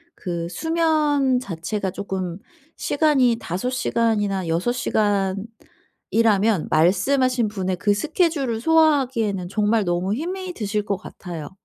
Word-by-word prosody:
그 170 -2 -4
수면 300 - +1
자체가 190 -1 -4
쪼끔 190 -2 -4 0.4
시간이 275 -6 +2
5 185 +9 -3
시간이나 210 -7 0
6 170 +9 +1
시간이라면 210 -1 -1
말씀하신 245 - +2
분의 190 -3 -2
그 205 +2 +2
스케줄을 285 - 0
소화하기에는 260 - +2
정말 210 +1 +1
너무 175 +3 0
힘이 365 +6 -4
드실 210 - -2
것 200 -2 -1
같아요. 170 -5 -8
215 Hz, 255 characters per minute, -22 LUFS, 190-265 Hz, 0.4 s, 시간이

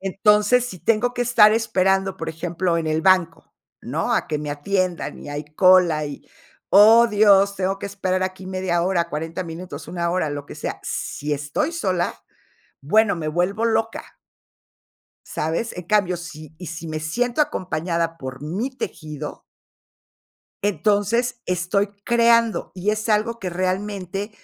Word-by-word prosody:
Entonces, 210 +5 +3
si 185 -6 -8
tengo 230 +5 +1
que 245 - 0
estar 225 -3 +6
esperando, 195 -4 +1
por 165 0 -5
ejemplo, 170 +2 -1
en 160 - -3
el 155 +1 0
banco, 180 -4 +2 0.3
¿no?, - - -2
a - - +1
que 150 - -2
me 150 0 -5
atiendan 180 +4 -2
y - - -10
hay 145 +1 -5
cola, 180 -5 +5
y, 145 - -9 0.4
oh, 220 +4 +8
Dios, 200 -2 +5
tengo 190 +1 -1
que - - -5
esperar 185 -2 -1
aquí 185 0 -4
media 185 -2 -1
hora, 175 -2 0
40 160 +3 -4
minutos, 165 -2 -8
una 170 -1 -2
hora, 175 -4 0
lo 145 -1 -5
que - - -9
sea, - - -5
si 150 +1 -4
estoy 145 - -1
sola, 185 - -1 0.7
bueno, 210 +7 +3
me 155 -2 -4
vuelvo 180 +8 0
loca. 225 0 -2 1.1
¿Sabes? 165 +9 -2
En 180 - -6
cambio, 185 -2 +2
sí 155 -3 -10
y 180 - -8
sí 165 +1 -7
me 155 0 -3
siento 240 - -1
acompañada 170 - -1
por 130 +1 -7
mi 195 - -3
tejido. 155 - -7 1.2
Entonces 215 +4 +1
estoy 180 +3 0 0.2
creando 235 -1 +3
y 190 +3 -1
es 215 +1 -3
algo 225 +2 +1
que 185 - -3
realmente 190 +2 -3
185 Hz, 150 wpm, -22 LUFS, 165-210 Hz, 1.2 s, oh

